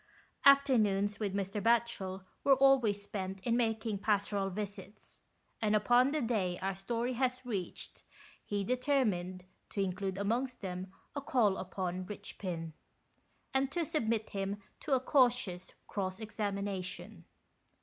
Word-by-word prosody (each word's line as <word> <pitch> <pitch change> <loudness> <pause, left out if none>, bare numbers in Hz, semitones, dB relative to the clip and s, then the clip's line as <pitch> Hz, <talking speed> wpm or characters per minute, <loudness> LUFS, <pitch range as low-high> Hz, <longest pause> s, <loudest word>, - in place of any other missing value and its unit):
Afternoons, 215 -8 +5
with 200 -3 -1
Mr. 200 +1 -2
Batchel, 225 -5 +1 0.2
were 275 - +6
always 255 -7 +4
spent 195 -1 -4
in 235 +4 +1
making 225 -3 0
pastoral 200 -1 +1
visits, 200 +1 -7 0.4
and 215 -1 +3
upon 245 +5 +5
the 300 -1 0
day 195 -7 0
our 195 +1 -1
story 235 +6 -2
has 255 +1 -1
reached 200 -7 -5 0.4
he 205 -1 -2
determined 215 -8 0 0.2
to - - -5
include 190 0 -1
amongst 240 +6 -1
them 185 -1 -5 0.2
a 285 - -2
call 235 -8 +3
upon 185 -1 -3
Eichpin, 180 -4 -5 0.8
and 265 0 +2
to 340 0 0
submit 230 -9 -1
him 195 0 -2 0.2
to 295 - -1
a - - +3
cautious 245 -9 +2
cross 190 -1 -3
examination. 200 -3 -4
205 Hz, 130 wpm, -33 LUFS, 195-245 Hz, 0.8 s, were